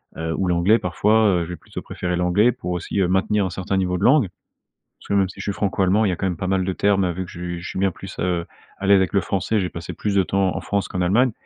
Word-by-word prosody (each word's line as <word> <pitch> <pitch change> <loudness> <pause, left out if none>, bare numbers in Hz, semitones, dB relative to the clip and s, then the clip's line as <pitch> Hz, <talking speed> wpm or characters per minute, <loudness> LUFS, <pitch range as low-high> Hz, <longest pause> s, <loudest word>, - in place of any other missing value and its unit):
heu, 80 0 -3
ou 95 - 0
l'anglais, 90 +6 +4
parfois, 105 +4 +2 0.2
heu, - - -1
je - - -11
vais 90 - -4
plutôt - - -9
préférer 90 -1 -3
l'anglais 90 +7 +3
pour 90 - -7
aussi, 90 +3 -3
heu, 90 - +2
maintenir 95 +2 +1
un - - -2
certain 95 +2 -2
niveau 90 -1 0
de - - -4
langue 135 -5 +5 0.7
parce - - -16
que - - -2
même 100 -2 +3
si 95 - -12
je - - -5
suis 100 - -2
Franco-Allemand, 100 +1 +1
il 100 - +2
y - - +1
a 90 - -3
quand - - -2
même 90 -2 0
pas 95 +3 -4
mal 95 -1 +1
de 95 - -1
termes, 95 -1 +2
vu 95 +2 -4
que - - -12
ju 85 0 -5
je - - -7
suis - - -4
bien 95 0 +2
plus, 95 +2 -10
heu, 85 -1 -1 0.3
à 100 - -5
l'aise 100 - +7
avec 95 -1 +1
le 100 - +3
français, 100 +2 0
j'ai 90 - -2
passé 85 +1 -7
plus 105 - -2
de 95 - +4
temps 95 0 0
en - - -3
France 100 -2 -2
qu'en 90 - -4
Allemagne 110 +8 +3
95 Hz, 300 wpm, -22 LUFS, 90-100 Hz, 0.7 s, l'aise